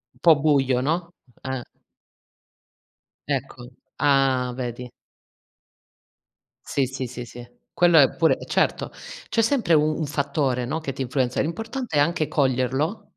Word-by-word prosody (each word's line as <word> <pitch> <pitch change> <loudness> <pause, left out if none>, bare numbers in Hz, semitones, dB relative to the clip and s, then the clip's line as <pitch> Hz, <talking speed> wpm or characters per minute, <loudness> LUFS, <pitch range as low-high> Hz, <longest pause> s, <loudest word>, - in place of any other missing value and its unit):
Un - - -26
po' 165 -2 +7
buio 135 -4 +2
no? 170 +4 -2 0.3
Eh. 130 -1 -3 1.7
Ecco, 130 -3 -4 0.3
ah 135 -3 +2
vedi! 125 -1 -5 1.8
Sì, 140 - 0
sì, 130 0 -5
sì, 125 0 -7
sì, 120 +1 -11 0.3
quello 175 -2 +4
è 140 -3 +5
pure 165 -1 +3
eh, - - -10
certo, - - 0 0.4
c'è 230 - +2
sempre 225 - +2
u 155 0 +3
un 160 - -2
fattore, 140 -3 -1
no, 155 +6 -2
che 140 -4 -5
ti 135 - -6
influenza. 125 -1 0
L'importante 225 - -4
è - - +5
anche 160 +1 +1
coglierlo 135 - 0
140 Hz, 135 wpm, -24 LUFS, 130-160 Hz, 1.8 s, po